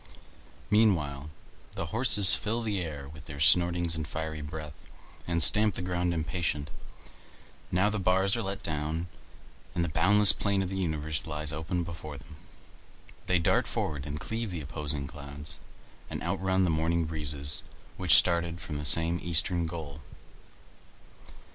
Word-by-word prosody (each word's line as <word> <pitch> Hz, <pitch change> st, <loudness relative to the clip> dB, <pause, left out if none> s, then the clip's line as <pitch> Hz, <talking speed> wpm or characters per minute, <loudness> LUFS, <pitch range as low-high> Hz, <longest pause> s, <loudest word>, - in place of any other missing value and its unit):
Meanwhile 80 Hz, -10 st, +2 dB, 0.4 s
the -, -, -4 dB
horses 110 Hz, -5 st, +4 dB
fill 115 Hz, +2 st, -1 dB
the 105 Hz, -4 st, -2 dB
air 75 Hz, -5 st, -6 dB
with 75 Hz, 0 st, -12 dB
their 75 Hz, -1 st, -9 dB
snortings 85 Hz, +2 st, +3 dB
and 80 Hz, -1 st, -3 dB
fiery 80 Hz, 0 st, -5 dB
breath, 75 Hz, 0 st, -7 dB, 0.5 s
and 85 Hz, -1 st, +1 dB
stamp 105 Hz, -1 st, +7 dB
the 90 Hz, -, -4 dB
ground 90 Hz, -1 st, -1 dB
impatient. 80 Hz, -3 st, -2 dB, 1.0 s
Now 95 Hz, +4 st, +2 dB
the 105 Hz, -, -2 dB
bars 95 Hz, +1 st, +2 dB
are 115 Hz, -, -2 dB
let 100 Hz, -1 st, -5 dB
down, 80 Hz, +2 st, -3 dB, 0.7 s
and 85 Hz, -, +1 dB
the -, -, -3 dB
boundless 105 Hz, +4 st, +6 dB
plain 100 Hz, -1 st, 0 dB
of 90 Hz, -, -4 dB
the 95 Hz, -, -4 dB
universe 80 Hz, -5 st, -2 dB
lies 75 Hz, -1 st, -2 dB
open 80 Hz, +3 st, -3 dB
before 80 Hz, -3 st, -8 dB
them. 70 Hz, +2 st, -14 dB, 0.9 s
They 90 Hz, -, +3 dB
dart 85 Hz, -, +1 dB
forward 75 Hz, -1 st, -3 dB
and 75 Hz, +1 st, -5 dB
cleave 115 Hz, +5 st, -4 dB
the 85 Hz, -3 st, -5 dB
opposing 75 Hz, -1 st, +1 dB
clouds, 75 Hz, 0 st, -8 dB, 0.5 s
and -, -, -5 dB
outrun 95 Hz, +1 st, 0 dB
the 90 Hz, -, +2 dB
morning 80 Hz, +1 st, 0 dB
breezes 75 Hz, -2 st, -2 dB, 0.3 s
which -, -, +5 dB
started 85 Hz, -1 st, +2 dB
from 75 Hz, -2 st, -6 dB
the 75 Hz, -, -4 dB
same 80 Hz, +3 st, +3 dB
eastern 85 Hz, 0 st, +2 dB
goal. 80 Hz, -3 st, -7 dB
80 Hz, 150 wpm, -29 LUFS, 75-90 Hz, 1.0 s, stamp